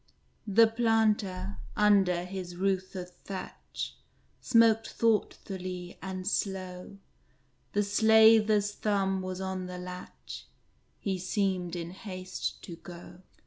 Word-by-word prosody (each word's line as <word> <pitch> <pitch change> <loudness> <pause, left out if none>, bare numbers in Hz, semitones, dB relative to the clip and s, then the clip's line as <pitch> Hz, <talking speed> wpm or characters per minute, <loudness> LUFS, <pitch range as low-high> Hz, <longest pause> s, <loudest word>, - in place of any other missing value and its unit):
The 220 +3 +6
Planter, 215 -4 +1 0.2
under 195 -4 +4
his 180 -1 -6
roof 190 0 -1
of 180 -1 -6
thatch, 190 -2 -6 0.4
Smoked 225 -2 +4
thoughtfully 185 -5 -1
and 185 0 -5
slow; 190 -1 -3 0.8
The 205 - +2
Slaver's 220 0 +5
thumb 195 -2 0
was 185 0 -4
on 190 -1 -3
the 180 0 -6
latch, 180 0 -8 0.5
He 190 -2 -2
seemed 185 -2 -1
in 170 0 -5
haste 185 -1 -5
to 170 - -8
go. 175 +1 -11
190 Hz, 105 wpm, -30 LUFS, 180-210 Hz, 0.8 s, The